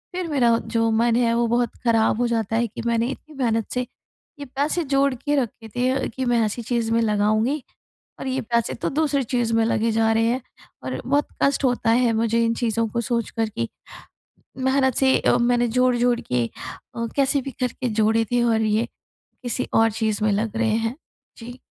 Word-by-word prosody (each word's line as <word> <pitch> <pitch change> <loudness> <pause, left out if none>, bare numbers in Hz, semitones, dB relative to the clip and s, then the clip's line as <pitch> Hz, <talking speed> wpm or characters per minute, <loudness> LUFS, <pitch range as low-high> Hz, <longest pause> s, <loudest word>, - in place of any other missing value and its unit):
फिर 365 -1 -2
मेरा 245 -7 +3
जो 225 0 +1
मन 235 -1 +3
है 235 -1 +2
वो 235 0 +2
बहुत 240 0 +1
ख़राब 225 -2 +3
हो 245 - +2
जाता 225 -2 -1
है 235 +1 +1
कि - - -8
मैंने 230 0 +1
इतनी 295 +3 -8
मेहनत 225 -2 0
से 250 - 0 0.6
ये 285 - -6
पैसे 285 +6 -1
जोड़ 275 -1 +2
के 290 +4 -1
रखे 225 -2 -7
थे 250 +1 +1
अ, 265 0 -1
कि 260 +3 -4
मैं 240 -1 +2
ऐसी 215 +3 -3
चीज़ 230 -1 -1
में 230 - +3
लगाऊँगी 215 +6 +1 0.6
और - - -5
ये 265 0 -1
पैसे 235 -1 -1
तो - - -3
दूसरी 295 -3 +1
चीज़ 240 -2 +1
में 225 - +3
लगे 230 0 +1
जा 225 0 +2
रहे 225 0 +2
हैं। 245 +3 0 0.4
और - - -4
बहुत 285 +2 +1
कष्ट 280 0 +2
होता 245 -3 +1
है 235 0 +3
मुझे 230 +1 +1
इन 230 0 +1
चीज़ों 230 -1 0
को 235 +2 -2
सोच 235 -1 -2
कर 225 -1 -1
कि 115 - -3 0.9
मेहनत 265 -1 +2
से 265 -1 +4
अ, - - +3
मैंने 240 0 +2
जोड़-जोड़ 245 0 +2
के 125 -1 -1 0.5
अ, 230 -1 -2
कैसे 275 0 +2
भी 275 - -6
करके 250 0 -1
जोड़े 225 +1 +3
थे 245 0 +2
और 225 -2 +2
ये 215 +1 +1 0.6
किसी 245 +1 -2
और 225 0 +4
चीज़ 220 -1 -1
में 215 - +3
लग 215 +2 -2
रहे 225 -1 +1
हैं। 225 +2 -1 0.4
जी। 245 +2 -10
235 Hz, 205 wpm, -23 LUFS, 225-255 Hz, 0.9 s, से